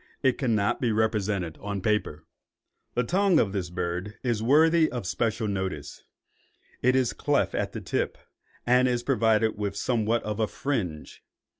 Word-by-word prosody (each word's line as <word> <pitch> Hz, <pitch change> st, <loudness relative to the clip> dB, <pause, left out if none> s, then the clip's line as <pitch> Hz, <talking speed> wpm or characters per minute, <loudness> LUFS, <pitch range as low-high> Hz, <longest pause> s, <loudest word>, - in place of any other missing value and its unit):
It 130 Hz, -2 st, +2 dB
cannot 110 Hz, -6 st, +1 dB
be 120 Hz, -3 st, +1 dB
represented 105 Hz, -6 st, 0 dB
on 100 Hz, 0 st, -3 dB
paper. 95 Hz, -7 st, -1 dB, 0.7 s
The 125 Hz, -, +2 dB
tongue 185 Hz, +5 st, +3 dB
of 100 Hz, -, +1 dB
this 95 Hz, -4 st, -2 dB
bird 90 Hz, +3 st, -4 dB
is 120 Hz, -4 st, 0 dB
worthy 155 Hz, +6 st, +4 dB
of 120 Hz, -6 st, -4 dB
special 110 Hz, +3 st, -1 dB
notice. 95 Hz, -7 st, -4 dB, 0.8 s
It 125 Hz, +1 st, +3 dB
is 130 Hz, -3 st, +2 dB
cleft -, -, 0 dB
at -, -, -2 dB
the -, -, -5 dB
tip, -, -, -2 dB, 0.5 s
and 125 Hz, +1 st, +4 dB
is 120 Hz, -1 st, 0 dB
provided 110 Hz, -1 st, +2 dB
with 100 Hz, -1 st, -2 dB
somewhat 115 Hz, 0 st, 0 dB
of 105 Hz, 0 st, -4 dB
a 110 Hz, -, +2 dB
fringe. 95 Hz, -, -4 dB
110 Hz, 155 wpm, -27 LUFS, 100-125 Hz, 0.8 s, worthy